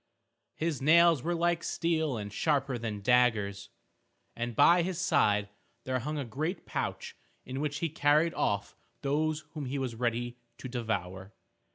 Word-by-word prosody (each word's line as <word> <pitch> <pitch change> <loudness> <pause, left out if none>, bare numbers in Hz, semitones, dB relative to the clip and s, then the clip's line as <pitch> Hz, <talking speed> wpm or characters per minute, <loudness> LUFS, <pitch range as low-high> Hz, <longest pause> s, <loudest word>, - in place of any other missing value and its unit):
His 155 -4 -2
nails 165 0 +5
were 175 +5 -1
like 170 0 +1
steel 160 -6 0
and 105 -1 -6
sharper 140 -4 0
than 110 -3 -4
daggers, 110 -5 +2 0.7
and 120 0 -4
by 175 +8 +6
his 180 0 -2
side 105 - +2 0.3
there 130 0 -1
hung 150 +5 -4
a 140 - -2
great 155 - -3
pouch - - -4 0.3
in 130 +1 -5
which 145 -1 -2
he 165 - 0
carried 150 +2 +3
off 100 -1 -1 0.3
those 155 +2 0
whom 150 -3 -5
he 135 +3 -3
was 130 -3 -2
ready 120 +1 -2 0.2
to - - -7
devour. 100 -5 -4
135 Hz, 155 wpm, -30 LUFS, 115-155 Hz, 0.7 s, by